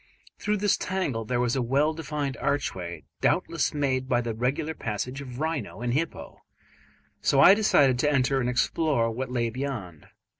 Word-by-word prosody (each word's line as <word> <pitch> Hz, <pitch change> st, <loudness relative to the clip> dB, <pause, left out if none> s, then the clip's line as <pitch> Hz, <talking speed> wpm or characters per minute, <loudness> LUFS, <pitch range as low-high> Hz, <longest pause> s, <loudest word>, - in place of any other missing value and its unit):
Through 210 Hz, 0 st, 0 dB
this 205 Hz, 0 st, +2 dB
tangle 165 Hz, -12 st, -2 dB
there 120 Hz, +2 st, -1 dB
was 125 Hz, +1 st, +1 dB
a 130 Hz, -, +1 dB
well 140 Hz, +6 st, +2 dB
defined 150 Hz, -4 st, -3 dB
archway, 90 Hz, -, -2 dB, 0.2 s
doubtless -, -, +1 dB
made 130 Hz, -3 st, -1 dB
by 120 Hz, -, +3 dB
the 115 Hz, -1 st, -3 dB
regular 135 Hz, +8 st, -1 dB
passage 125 Hz, +2 st, -4 dB
of 125 Hz, -2 st, -8 dB
rhino 150 Hz, -8 st, -3 dB
and 120 Hz, 0 st, -1 dB
hippo, 160 Hz, +4 st, -3 dB, 0.8 s
so 135 Hz, -, +3 dB
I 180 Hz, -, +9 dB
decided 140 Hz, -, +3 dB
to 150 Hz, +2 st, +2 dB
enter 135 Hz, -1 st, +2 dB
and 125 Hz, -1 st, 0 dB
explore 125 Hz, -1 st, +1 dB
what 125 Hz, +3 st, -4 dB
lay 120 Hz, -2 st, -1 dB
beyond. 115 Hz, -, -5 dB
130 Hz, 165 wpm, -26 LUFS, 120-150 Hz, 0.8 s, I